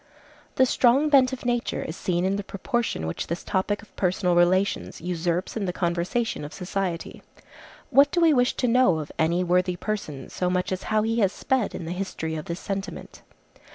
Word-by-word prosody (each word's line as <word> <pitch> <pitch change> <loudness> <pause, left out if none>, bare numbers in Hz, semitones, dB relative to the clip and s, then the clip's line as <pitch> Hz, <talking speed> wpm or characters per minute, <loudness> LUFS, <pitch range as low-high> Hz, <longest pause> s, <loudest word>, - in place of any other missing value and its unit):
The 260 - +5
strong 260 +4 +3
bent 270 -3 +5
of 260 -1 -6
nature 240 -1 -1
is 160 - -6
seen 175 -1 -1
in 190 +1 +1
the 200 - -3
proportion 205 - -2
which 80 - -4
this 170 +2 -4
topic 205 +1 -1
of 215 - -20
personal 180 -1 +1
relations 185 +3 +2
usurps 175 +1 -2
in 215 -3 -2
the 180 - -1
conversation 175 +4 -1
of 145 - -8
society. 180 -2 -3 0.7
What 280 +1 +6
do 350 - 0
we 330 -2 +5
wish 250 -1 +2
to 250 - 0
know 235 -8 +4
of 155 -1 -5
any 170 +3 +2
worthy 180 +1 +2
person 175 -9 -4
so 180 - -1
much, 180 +1 -1
as 185 0 -2
how 215 -1 +2
he 225 +1 0
has 195 -3 +3
sped 260 -1 -1
in 170 - -5
the 165 - -4
history 180 -3 -4
of 155 -1 -4
this 170 +1 -4
sentiment? 195 -1 -6
190 Hz, 195 wpm, -25 LUFS, 175-230 Hz, 0.7 s, What